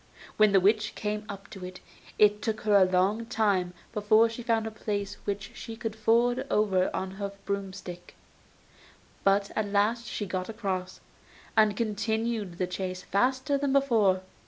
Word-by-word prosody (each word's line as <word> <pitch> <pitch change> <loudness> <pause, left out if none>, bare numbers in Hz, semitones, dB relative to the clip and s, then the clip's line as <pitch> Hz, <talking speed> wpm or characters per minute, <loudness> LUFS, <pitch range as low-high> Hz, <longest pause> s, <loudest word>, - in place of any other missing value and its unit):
When 215 -1 +5
the 195 - +6
witch 215 +3 +2
came 210 0 -3
up 200 -1 -8
to 190 - -9
it, 180 0 -8 0.4
it 210 0 +4
took 220 0 -2
her 210 -1 +2
a 195 -2 +7
long 200 +5 +1
time 200 -6 +1 0.2
before 215 +1 +4
she 230 +2 -7
found 230 -2 +1
a 220 - -4
place 205 -2 -4
which 200 -1 -3
she 225 - -8
could 225 -2 -4
ford 240 +4 +2
over 190 -3 +2
on 190 0 -3
her 200 0 -3
broom 200 -1 -2
stick; 180 -2 -10 1.1
but 200 0 +2
at 215 -1 0
last 210 +4 +1
she 205 - -3
got 185 0 -3
across, 190 -4 -4 0.5
and 215 -2 +4
continued 220 -3 -1
the 185 - 0
chase 185 0 -4
faster 260 +6 +1
than 280 -1 0
before. 220 -9 +3
210 Hz, 165 wpm, -28 LUFS, 195-225 Hz, 1.1 s, a